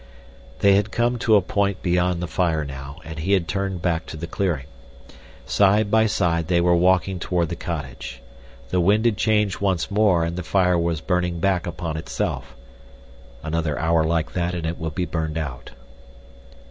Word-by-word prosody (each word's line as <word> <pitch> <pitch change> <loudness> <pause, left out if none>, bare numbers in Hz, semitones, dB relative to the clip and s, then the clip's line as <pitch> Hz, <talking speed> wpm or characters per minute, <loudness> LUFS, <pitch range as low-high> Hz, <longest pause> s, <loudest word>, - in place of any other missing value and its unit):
They 100 0 +6
had 100 +1 0
come 120 +2 0
to 110 -2 +4
a 100 - +4
point 100 0 -1
beyond 90 0 +1
the - - -2
fire 80 -2 0
now, 70 +1 -8
and 80 -1 -7
he 95 +5 0
had 90 -4 +2
turned 95 -3 -2
back 85 -2 0
to - - -7
the 85 - -5
clearing. 85 -5 -2 0.8
Side 105 +1 +3
by 110 0 +4
side 85 -5 0
they 85 -1 +3
were 85 0 +4
walking 90 +1 +2
toward 85 -1 0
the 85 - -3
cottage. 70 -7 -6 0.5
The 90 - +1
wind 105 +6 +3
had 115 -3 +3
changed 105 -2 +1
once 95 -2 0
more 100 -5 +3
and 85 +1 -4
the - - -2
fire 90 0 +2
was 85 -2 -1
burning 90 -1 -1
back 95 -1 +1
upon 80 -2 -4
itself—another 60 +4 -5
hour 80 0 +2
like 80 0 0
that 90 0 -1
and 85 -2 -4
it 85 +2 -3
would 80 -2 -4
be 90 - 0
burned 80 -2 -3
out. 70 -6 -5
85 Hz, 180 wpm, -23 LUFS, 80-95 Hz, 0.8 s, They